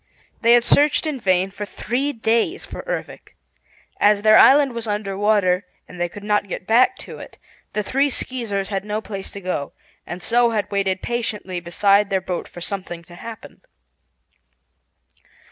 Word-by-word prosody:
They 235 +1 +5
had 240 0 +5
searched 295 +5 +4
in 300 -4 -2
vain 190 -2 +1
for 200 +1 -6
three 245 +7 -2
days 230 - 0
for - - -7
Ervic. - - -6 0.6
As 205 0 +4
their 215 0 +7
island 275 +2 +6
was 235 -1 -5
under 205 -2 -2
water 200 -2 +2 0.2
and 180 - -12
they 175 - 0
could 205 +3 -11
not 210 -1 +1
get 185 - -6
back 245 - +4
to - - -10
it, - - -11 0.4
the 210 - -1
three 275 +7 +1
Skeezers 225 -7 -2
had 195 -2 -2
no 210 +1 -2
place 200 -3 -6
to 200 - -9
go, 180 -6 -3 0.3
and 175 +1 -7
so 240 0 +3
had 210 -2 -2
waited 195 -2 -1
patiently 215 -6 -3
beside 200 +4 +2
their 190 - +1
boat 185 -1 -4
for 175 - -11
something 175 -3 -5
to 175 - -16
happen. 220 +5 -10
205 Hz, 170 wpm, -21 LUFS, 190-235 Hz, 0.6 s, their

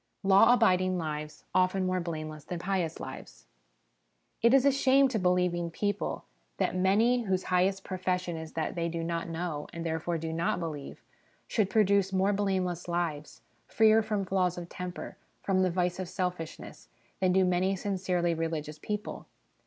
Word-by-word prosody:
Law 195 +4 +6
abiding 185 -6 +3
Lives 150 -2 -5
often 185 +1 +2
more 185 0 0
blameless 155 -3 -5
than 175 - -5
Pious 180 -2 -2
Lives. - - -9 1.0
It 235 +1 +5
is 270 0 +5
a 280 - +6
shame 275 0 +4
to 230 -4 -1
believing 180 -2 +1
people 205 +4 -2 0.3
that - - 0
many 220 +6 +3
whose 190 -1 0
highest 190 +2 +2
profession 180 -2 -2
is 160 -1 -7
that 160 - -2
they 170 -1 -1
do 165 0 -3
not 170 0 -3
know, 165 -3 -4
and 170 -1 -6
therefore 165 +1 -1
do 160 0 -4
not 165 +2 0
believe, 155 -5 -6 0.4
should 210 -4 +1
produce 200 -3 +3
more 190 +2 +2
blameless 185 -4 -1
lives, 155 -7 -3 0.3
freer 220 0 +5
from 210 -2 -2
flaws 185 -2 0
of 175 -1 -7
temper, 180 0 -7 0.3
from 190 -1 +2
the 185 - +3
vice 180 0 -1
of 185 -2 -4
selfishness, 180 -4 -5 0.3
than 185 -1 +3
do 190 0 +4
many 180 +2 +1
sincerely 185 -3 -1
religious 155 -2 -3
people. 210 +5 -5
180 Hz, 160 wpm, -29 LUFS, 170-195 Hz, 1.0 s, Law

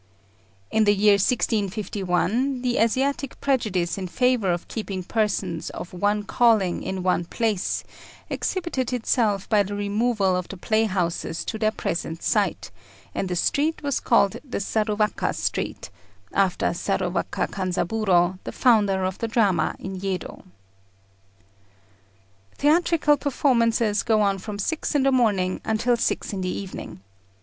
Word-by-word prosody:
In 220 -1 +3
the 205 0 +4
year 205 +1 +5
1651, 210 +3 0
the 245 -1 +1
Asiatic 270 +4 0
prejudice 205 -10 0
in 185 - -4
favour 250 -2 +2
of 175 0 -3
keeping 195 -4 -4
persons 190 -5 -1
of 180 - -8
one 205 +3 0
calling 215 -5 +2
in 190 -1 -4
one 180 -1 +2
place 215 0 -1 0.4
exhibited 340 -10 -2
itself 220 -4 +1
by 210 -2 +4
the 200 +1 -3
removal 205 -1 +1
of 180 -1 -2
the 195 - -8
playhouses 185 -6 -1
to 220 - -4
their 215 -1 +3
present 165 -5 -4
site, - - 0 0.4
and 190 - -2
the 180 - -1
street 300 - 0
was 280 -2 0
called 200 -5 +3
the 265 - -5
Saruwaka 210 0 0
Street, - - -3 0.4
after 195 -2 +1
Saruwaka - - -1
Kanzaburô, 185 -1 +1
the - - -5
founder 205 -6 +3
of 185 0 -2
the 230 - -1
drama 200 -8 +1
in 190 0 -6
Yedo. 190 -3 -4 2.1
Theatrical 305 0 +3
performances 235 -6 +2
go 220 -2 +2
on 200 -1 +1
from 205 +2 -6
six 310 +9 -2
in 280 - +3
the 275 - +3
morning 205 -8 +1
until 230 +3 +1
six 235 -2 -1
in 190 - -3
the 185 - -2
evening. 185 - -6
210 Hz, 135 wpm, -24 LUFS, 190-240 Hz, 2.1 s, year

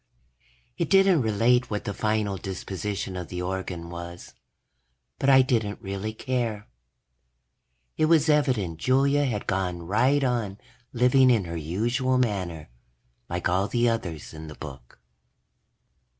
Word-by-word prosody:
_ - - -47 0.8
It - - 0
didn't 195 -5 +5
relate 115 +3 +2
what 105 -1 -3
the 100 - -3
final 105 -1 0
disposition 95 +1 -4
of 90 -2 -5
the 90 0 -5
organ 90 -2 -4
was, 85 0 -8 0.9
but 135 - +2
I 130 -1 +7
didn't 110 -5 -1
really 100 +1 -4
care. 115 -3 -3 1.3
It 155 - +3
was 160 -1 +4
evident 125 - +1
Julia 140 - +3
had 110 -6 -2
gone 90 -2 -2
right 125 +10 +2
on 115 -6 -1 0.3
living 125 +2 +4
in 115 -6 +3
her 85 0 -5
usual 120 - 0
manner, 90 - -2 0.6
like 90 +1 -1
all 95 +3 +1
the 120 +1 +1
others 85 -11 -4
in 80 0 -9
the 75 - -9
book. 65 -5 -11
105 Hz, 135 wpm, -26 LUFS, 90-125 Hz, 1.3 s, I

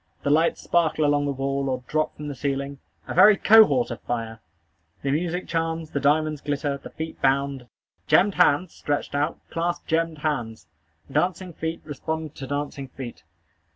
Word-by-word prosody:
The 140 - +1
lights 160 +3 +2
sparkle 160 -3 +2
along 145 0 +2
the - - 0
wall, 135 0 -1
or 130 -1 -2
drop 155 0 -1
from 150 - -7
the 145 - -4
ceiling 140 +1 -3 0.3
a - - -4
very 210 -1 +7
cohort 200 - +6
of 115 - -6
fire! 115 -2 -4 0.6
The 140 - 0
music 175 +4 -1
charms. 165 -1 -2
The 140 - -1
diamonds 150 +1 +2
glitter. 145 0 -1
The - - -10
feet 160 0 -7
bound. 135 -1 +1 0.4
Gemmed 195 +2 +4
hands, 180 0 +3
stretched 145 -1 -3
out, 145 +3 0
clasp 170 +1 -2
gemmed 165 -1 0
hands. 120 -9 -2 0.5
Dancing 180 +4 0
feet 160 +1 -4
respond 155 +1 -4
to 135 - -6
dancing 145 -1 -4
feet. 125 -1 -9
145 Hz, 165 wpm, -24 LUFS, 140-165 Hz, 0.6 s, very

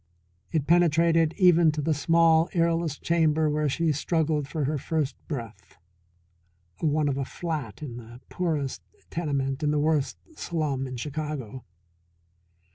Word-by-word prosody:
It 155 -4 0
penetrated 165 -1 +3
even 175 -3 +5
to 155 - -4
the 160 - +2
small 165 +2 +3
airless 165 -2 +1
chamber 160 -2 +2
where 150 0 0
she 165 +3 +1
struggled 155 -1 0
for 150 +2 -3
her 150 +1 -1
first 150 -1 -1
breath 115 - -7 1.0
one 155 -1 +1
of 140 -1 -1
a - - 0
"flat" 150 - -5
in 120 -5 -6
the 120 0 -11
poorest 155 -7 -2 0.3
tenement 140 -4 -2
in 150 - +1
the 150 - +1
worst 150 -1 +1 0.2
slum 150 - -2
in 130 -1 -6
Chicago. 140 -3 -5
155 Hz, 135 wpm, -26 LUFS, 140-165 Hz, 1.0 s, even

